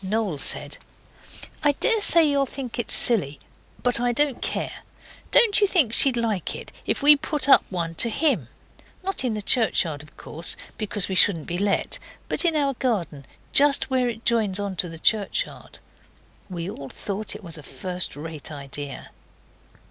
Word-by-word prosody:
Noel 195 -5 -2
said, - - +1 0.8
'I 295 -2 +2
daresay 405 - +5
you'll 280 -2 +1
think 250 -3 -7
it's 235 - -2
silly, 150 - +5 0.4
but 245 -1 +5
I 245 0 0
don't 285 0 -1
care. - - -4 0.5
Don't 450 -4 +4
you 410 - +4
think 310 - +1
she'd 260 -1 +3
like 220 -7 -2
it, - - -10 0.2
if - - -2
we 295 +1 +7
put 295 +1 -2 0.2
one 170 -3 -3
up 165 - -16
to 235 - +5
HIM? 230 - 0 0.6
Not 390 -5 -1
in 240 -4 -2
the 210 - -5
churchyard, 180 - +1
of 150 - -18
course, 165 +3 -6 0.2
because 205 -2 -2
we 190 - -4
shouldn't 180 -4 +2
be 175 +1 -4
let, 200 0 0 0.3
but - - +1
in 330 -2 +1
our 280 -2 0
garden, 190 - -3 0.3
just 285 -1 +4
where 255 -2 +1
it 230 0 -8
joins 215 -5 +2
on 200 -2 -4
to 175 - 0
the 165 - -9
churchyard?' 205 +4 -1 0.7
And 185 - -9
we 170 0 -5
all 140 -8 -8
thought 205 +1 -5
it 210 - -11
was 165 -3 -7
a - - -10
first 180 +6 -5
rate 155 0 -9
idea. 140 -1 -8
215 Hz, 175 wpm, -23 LUFS, 170-270 Hz, 0.8 s, we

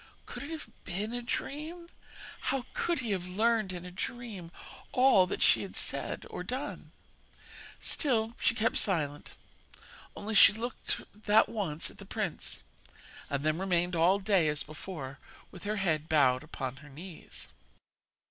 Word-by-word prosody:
'Could - - -7
it 285 - -6
have 320 -2 -6 0.2
been 205 +5 -3
a 245 - -2
dream? 310 +7 -4 0.6
How 260 -1 0
could 345 -5 0
he 235 -4 -2
have 185 -2 -1
learnt 215 +1 +2
in 180 -1 -6
a 180 - -7
dream 205 -4 -5 0.4
all 250 -8 +6
she - - +5
had - - -6
done - - -1
or - - -4
said?' - - -4 0.9
Still 230 -6 +2
she 230 - +3
kept 225 0 +2
silent; 150 -7 0 0.8
only 215 +2 -4
she 205 - +9
looked 235 +3 -2
that 210 +1 +4
once 175 -8 -2
at - - -18
the - - -9
prince, - - -3 0.7
and 140 0 -1
then 155 +2 +1
remained 180 -2 +1
all 170 +4 +5
day 195 -5 +3
as 150 -1 0
before, 155 -3 -7 0.3
with 180 - -10
her 210 +1 0
head 160 -6 0
bowed 130 -5 +4
upon 135 -4 -5
her 145 +2 -13
knees. 165 +5 -10
190 Hz, 150 wpm, -31 LUFS, 160-230 Hz, 0.9 s, she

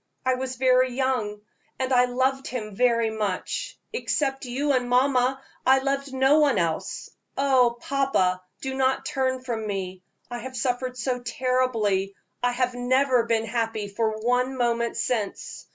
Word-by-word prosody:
I 260 - +3
was 255 0 -3
very 255 0 +3
young, 245 -6 -1 0.4
and 260 0 -1
I 250 0 +5
loved 260 +2 0
him 220 -4 -5
very 230 -1 +2
much; 210 -4 -3 0.2
except 275 - -1
you 270 +4 -1
and 250 -2 0
mamma, 255 +1 +3 0.2
I 265 +1 +5
loved 275 +1 -1
no 265 +3 +4
one 285 -7 +3
else. 175 +3 -2 0.3
Ah! 265 -3 +4
papa, 235 -10 +1 0.2
do 265 -1 -3
not 265 0 +1
turn 260 -1 -1
from 225 -4 -3
me; 190 -2 -4 0.3
I 240 - -4
have 260 +2 -7
suffered 250 +1 -1
so 250 -1 -1
terribly 235 -6 0 0.3
I 245 - +2
have 250 0 0
never 250 0 +2
been 225 -1 +1
happy 225 -2 -2
for 220 +1 -1
one 250 +3 0
moment 235 -1 0
since. 230 -3 -3
250 Hz, 150 wpm, -25 LUFS, 225-265 Hz, 0.4 s, I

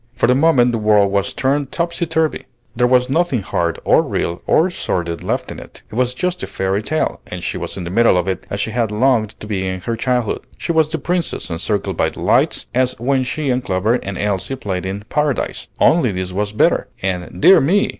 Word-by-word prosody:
For - - +2
the 125 - +4
moment 130 -4 +4
the 115 - -1
world 105 -2 +3
was 100 0 0
turned 140 +1 0
topsy 170 0 -2
turvy. 160 -1 -1 0.3
There 125 +1 +3
was 125 0 +3
nothing 135 - +1
hard 85 -3 -1
or - - +5
real 85 +1 -3
or 175 +4 +3
sordid 85 - -2
left - - -2
in - - -7
it; - - -13
it - - -12
was 125 +2 0
just 180 +4 -2
a - - -4
fairy 95 +2 -1
tale, 155 +8 -1
and 90 -1 -7
she - - -2
was - - -5
in 95 - -4
the 85 - -5
middle 115 -2 +4
of 90 - 0
it 95 - -3
as 100 - -3
she 110 - -1
had 115 -2 0
longed 110 -1 +1
to - - -8
be 95 -3 -2
in 95 0 -3
her 115 +5 -2
childhood. 125 -1 0 0.2
She - - -2
was 160 -2 +3
the 160 - -2
Princess, 175 - -2
encircled 100 +6 -2
by - - +2
delights, - - +1
as 130 -1 +1
when 130 +2 +1
she 140 +2 -1
and 125 0 0
Clover 100 +1 +1
and 100 -1 -5
Elsie 105 +5 -1
played 95 -6 -4
in 100 +2 -5
"Paradise," 150 -2 -1
only, 150 -9 +4
this 90 -1 -4
was 105 +2 -1
better; 105 - +2 0.2
and, 90 -2 -3
dear 190 - +7
me! 185 +9 +2
115 Hz, 225 wpm, -18 LUFS, 95-140 Hz, 0.3 s, dear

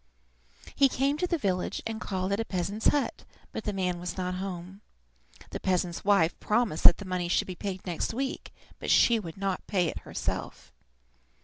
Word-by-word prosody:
He 275 -1 +5
came 275 +3 +1
to 360 - +1
the 345 - +1
village 185 - -1
and 225 0 -4
called 190 -1 -2
at 200 - +1
a - - +1
peasant's 200 +3 -1
hut, 290 -2 +1 0.3
but - - -5
the 210 - 0
man 180 -3 -1
was 180 +1 -5
not 180 -1 -1
at 180 - -4
home. 190 +1 -6 0.7
The - - -4
peasant's 180 -2 0
wife 195 -5 +3
promised 215 -7 0
that 175 - +10
the 200 - -8
money 180 -1 -1
should 175 - +2
be 185 - -5
paid 190 0 -5
next 175 -3 -1
week, 265 +3 -3 0.3
but - - -4
she 235 -2 +6
would 170 -5 -8
not 195 -1 -2
pay 180 -5 +2
it - - -5
herself. - - -5
190 Hz, 195 wpm, -29 LUFS, 180-220 Hz, 0.7 s, that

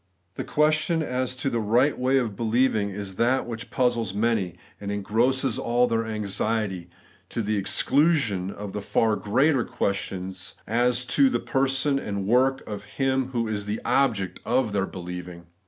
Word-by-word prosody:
The - - -4
question 155 +2 +2
as 130 -2 -2
to 135 +1 -1
the 120 - 0
right 120 +7 +3
way 130 +2 +2
of 115 -6 -1
believing 115 -1 +1
is 100 -1 -6
that 125 +3 +2
which 115 0 -6
puzzles 120 -6 0
many, 105 -5 0 0.2
and 100 0 -4
engrosses 115 +5 +1
all 120 +1 +2
their 115 -2 0
anxiety, 105 -3 -2 0.4
to 115 - -2
the 105 +1 0
exclusion 120 - +2
of 100 0 -7
the 105 - -3
far 110 +2 +2
greater 125 +7 +2
questions 95 -2 -3
as 120 +2 +1
to 265 - +4
the - - 0
person 135 +1 +1
and 100 -5 -3
work 130 +5 +2
of 100 -1 -5
Him 135 -1 +1
who 120 -3 -2
is 105 -1 -3
the 105 +2 -2
object 105 -10 +1
of 125 -4 +1
their 95 -1 0
beUeving. 90 -1 -7
115 Hz, 160 wpm, -25 LUFS, 100-130 Hz, 0.4 s, to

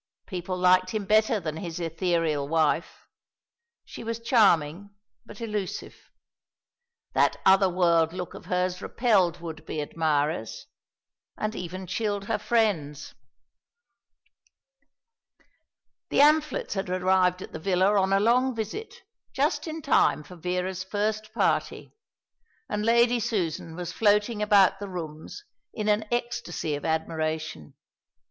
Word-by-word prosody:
People 185 -1 -4
liked 185 +2 +3
him 210 -2 -2
better 215 +1 +3
than 155 -3 -5
his 170 -1 -5
ethereal 165 -3 -1
wife. 160 +1 0 0.8
She - - -9
was 230 0 -3
charming, 200 - +2 0.4
but 210 - -11
elusive. 210 -4 -4 1.2
That - - +2
other 190 0 +6
world 170 -3 +2
look 180 0 -6
of - - -11
hers 180 0 -1
repelled 190 -8 +1
would 160 -2 -7
be 155 - -5
admirers, 150 -5 -1 0.7
and 215 0 -2
even 185 +2 -6
chilled 205 +1 -2
her 225 - -1
friends. 170 - 0 3.0
The - - -2
Amphletts 300 0 +3
had 195 -2 -3
arrived 185 0 +2
at - - -11
the 160 - -7
villa 190 +3 +2
on 190 0 0
a 195 - +4
long 245 +4 +2
visit, 225 - -6 0.3
just - - 0
in 320 -1 -6
time 205 - +3
for 180 - -12
Vera's 180 +2 -3
first 215 +2 -2
party; 230 - -1 0.7
and 210 - -2
Lady 235 +2 +4
Susan 180 -8 -2
was 175 -1 -5
floating 210 +1 +2
about 200 -2 +4
the 200 -1 -6
rooms 165 - -7 0.3
in 215 -1 -3
an 210 +1 +2
ecstasy 235 -10 -2
of 145 - -4
admiration. 160 - -3
185 Hz, 125 wpm, -26 LUFS, 165-215 Hz, 3.0 s, other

